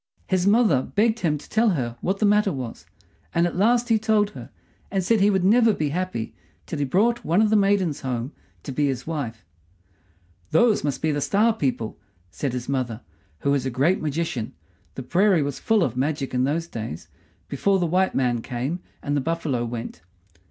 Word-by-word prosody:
His 185 0 +1
mother 205 - +4
begged 220 - +1
him 155 -7 +1
to 145 - -13
tell 225 +1 +2
her 125 - -1
what 190 +2 0
the 210 - +1
matter 210 -1 +3
was; 130 -6 -6 0.5
and 170 - +3
at 175 - -2
last 235 +6 +2
he 225 -1 +4
told 210 -1 +2
her, - - -10 0.4
and 195 -2 -1
said 220 +3 +2
he 200 - +5
would 190 -3 +1
never 225 +2 +4
be 150 -2 -1
happy 175 -8 -3 0.3
till 160 - -5
he 145 - +1
brought 225 - +1
one 170 +5 +2
of 215 -1 +3
the - - +4
maidens 195 -6 +2
home 125 0 -3 0.3
to 140 - -6
be 145 +2 +1
his 130 -2 -3
wife. 120 -10 -5 1.0
"Those 215 +7 +3
must 145 -1 -2
be 160 - +2
the 145 0 -1
Star 215 +9 +3
people," 130 - -2 0.3
said 135 +4 -3
his 125 -1 -4
mother, 125 -4 -2 0.4
who 140 - +1
was 140 -2 +1
a 130 - -1
great 140 +9 +1
magician 150 -6 -2 0.4
the 130 - -5
prairie 185 +2 +3
was 140 -1 -4
full 220 -4 +2
of - - -1
magic 140 +1 -2
in 125 0 +2
those 160 +4 -1
days, 110 - -7 0.4
before 195 +8 +1
the 180 - 0
white 185 +3 +1
man 120 -3 +1
came 130 +9 -3 0.2
and 145 - -1
the 145 - +1
buffalo 155 -5 -1
went. 115 -8 -6
160 Hz, 200 wpm, -24 LUFS, 130-200 Hz, 1.0 s, he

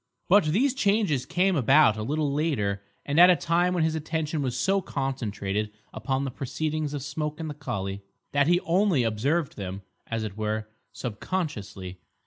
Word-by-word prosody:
But 200 -1 +5
these 235 - +2
changes 200 - +1
came 180 +2 +2
about 135 -3 +5
a 110 - -4
little 145 +4 -1
later, 115 -11 0 0.2
and 145 +3 +1
at 180 +1 +9
a 180 - +7
time 175 +3 +1
when 170 - +2
his 160 0 +1
attention 160 -1 -2
was 130 -2 -2
so 195 +7 +2
concentrated 110 - -2 0.2
upon 130 +5 -1
the 135 - -3
proceedings 150 +3 -3
of 140 - -4
Smoke 150 +2 -4
and 160 - -4
the - - -5
collie, 100 -9 -4 0.3
that 145 0 +3
he 175 +1 +4
only 175 -5 +2
observed 135 +9 0
them, 95 0 -5 0.2
as 115 -1 -2
it 105 -3 -5
were, 110 0 -2 0.2
subconsciously. 105 - -4
145 Hz, 170 wpm, -27 LUFS, 110-165 Hz, 0.3 s, at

